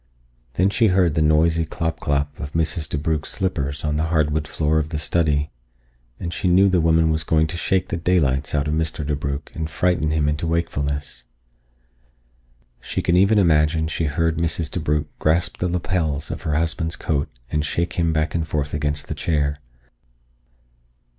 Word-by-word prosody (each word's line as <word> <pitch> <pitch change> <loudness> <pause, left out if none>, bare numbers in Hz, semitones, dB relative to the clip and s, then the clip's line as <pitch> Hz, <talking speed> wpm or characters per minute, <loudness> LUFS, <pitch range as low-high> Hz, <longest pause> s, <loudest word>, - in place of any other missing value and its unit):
Then 95 +2 +2
she 115 +1 +3
heard 90 -4 +3
the 80 - +1
noisy 80 +2 +3
clop 80 0 -3
clop 70 0 -1
of 70 +1 -6
Mrs. 80 -1 0
DeBrugh's 75 +1 -1
slippers 75 -7 -2
on 75 0 0
the 80 - 0
hardwood 80 -2 0
floor 80 0 +1
of 75 0 -3
the 80 - -3
study, 75 -2 0 0.7
and 85 0 -4
she - - -1
knew 95 +3 +5
the 90 -2 +2
woman 80 0 +3
was 80 0 0
going 80 +1 +2
to 80 - -4
shake 90 +1 0
the - - -2
daylights 75 -6 +1
out 75 0 0
of 75 - -1
Mr. 80 -1 -1
DeBrugh 70 -1 -3
and 80 0 -3
frighten 85 -3 +1
him 75 -1 +1
into 75 +2 -1
wakefulness. 70 -6 -2 1.5
She - - -4
could 85 - +2
even 100 +4 +4
imagine 80 -3 +3
she 80 +1 -1
heard 80 +2 0
Mrs. 80 -1 -1
DeBrugh 75 -3 0
grasp 80 +3 +1
the 90 - -1
lapels 85 -4 -1
of - - -5
her 80 -3 -1
husband's 80 +1 -1
coat 75 -3 -1 0.2
and 75 -1 0
shake 85 +3 -1
him 85 -1 +1
back 80 0 0
and 80 -1 -1
forth 75 -1 -2
against 75 0 -1
the - - -3
chair. 75 -2 -1
80 Hz, 175 wpm, -22 LUFS, 75-85 Hz, 1.5 s, knew